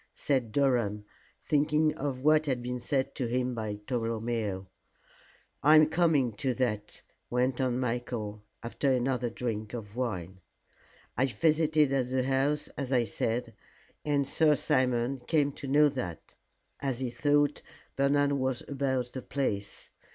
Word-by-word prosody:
said 130 -6 0
Durham, 115 -6 +1 0.4
thinking 150 +1 +2
of 140 -4 -4
what 155 0 +4
had 125 -3 -1
been 125 0 -3
said 135 +1 -1
to 125 - -2
him 125 +1 -1
by 110 -3 -3
Tolomeo. 115 -5 -2 1.0
"I 150 +3 +6
am 155 0 +6
coming 155 -8 +2
to 130 -1 -1
that," 105 -5 -2 0.3
went 125 +1 0
on 125 -1 0
Michael, 115 -4 -3 0.2
after 135 +4 0
another 125 -1 0
drink 115 -2 -4
of 105 -3 -8
wine. 95 -7 -4 0.7
"I 130 +4 +2
visited 155 0 +2
at 130 -2 0
the 130 0 +1
house 135 +3 +1
as 135 -2 -5
I 125 -3 +3
said, 115 +1 -2 0.5
and 145 -2 +1
Sir 155 0 +4
Simon 130 -2 +1
came 150 -3 +2
to 140 - -8
know 150 +2 +5
that 95 - -6 0.5
as 135 -3 -2
he 130 -2 -2
thought 145 +2 +2 0.3
Bernard 140 +1 +2
was 130 -3 -1
about 130 -3 -1
the 130 - -5
place. 105 -8 -3
130 Hz, 145 wpm, -29 LUFS, 120-140 Hz, 1.0 s, I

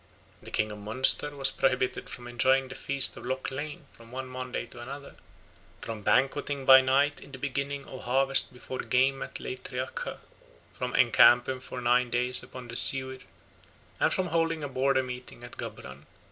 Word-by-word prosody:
The - - -11
king 105 0 0
of 105 - -8
Munster 130 +7 +2
was 135 -1 +1
prohibited 130 -1 0
from 120 -1 -9
enjoying 130 +2 +2
the - - -7
feast 135 0 0
of - - -9
Loch 130 +2 -3
Lein 150 +3 -6
from 115 0 -17
one 130 +1 -5
Monday 130 -1 -5
to 120 0 -12
another; 140 +3 -8 0.7
from 110 -2 -6
banqueting 135 +4 +1
by 130 0 +9
night 140 +3 +2
in - - -13
the 130 - -8
beginning 140 +1 -3
of 130 - -10
harvest 135 +2 +3
before 130 +1 -8
Geim 135 +2 +1
at - - -6
Leitreacha; 130 0 -5 0.6
from - - -4
encamping 120 +2 +5
for 125 0 -7
nine 125 +1 +3
days 125 +1 +2
upon 125 -1 -10
the 120 - -8
Siuir; 130 +1 0 0.8
and - - +3
from 185 -1 0
holding 165 -1 0
a - - -2
border 130 0 +1
meeting 125 -1 -8
at 120 - -10
Gabhran. 65 +2 -8
130 Hz, 175 wpm, -28 LUFS, 125-135 Hz, 0.8 s, by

